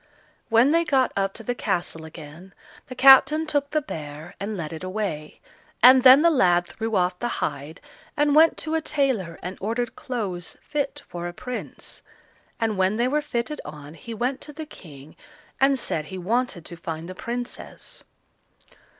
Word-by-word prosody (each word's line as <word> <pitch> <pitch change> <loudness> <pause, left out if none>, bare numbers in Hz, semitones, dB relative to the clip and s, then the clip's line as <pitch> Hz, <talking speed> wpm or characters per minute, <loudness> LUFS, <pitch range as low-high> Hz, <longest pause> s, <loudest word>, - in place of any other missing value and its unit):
When 235 +5 +5
they 335 +1 +4
got 270 -5 +2
up 195 0 0
to 225 - -7
the 245 - -1
castle 170 -7 -2
again, 160 +4 -12 0.3
the 255 - -8
captain 270 +4 +7
took 290 -2 -1
the 305 0 0
bear 155 - -8
and 205 +1 -4
led 160 -2 -5
it 160 - -7
away, 185 -6 -4 0.4
and 255 +1 +9
then 260 +3 +8
the 335 - +6
lad 175 - +3
threw 225 +4 -4
off 180 -1 +1
the 240 - -1
hide, 145 +3 -4 0.4
and 295 0 +3
went 315 +2 +6
to 315 - -3
a 320 - +1
tailor 265 - -1
and 180 +2 -6
ordered 230 +4 -2
clothes 195 -9 -5
fit 290 -1 -3
for 175 0 -5
a 175 - -6
prince; 250 +7 -6 0.6
and 220 -3 -1
when 190 +2 +2
they 240 +2 +1
were 295 +3 +1
fitted 295 0 -3
on 150 0 -10
he 230 +6 -8
went 250 +4 -2
to 300 - -8
the 310 +2 -7
King, 150 - -13 0.4
and 270 0 +4
said 160 -10 -3
he 190 - -7
wanted 205 -1 -1
to 170 - -7
find 165 -1 -6
the 185 - -7
Princess. 240 +5 -6
225 Hz, 175 wpm, -24 LUFS, 175-270 Hz, 0.6 s, and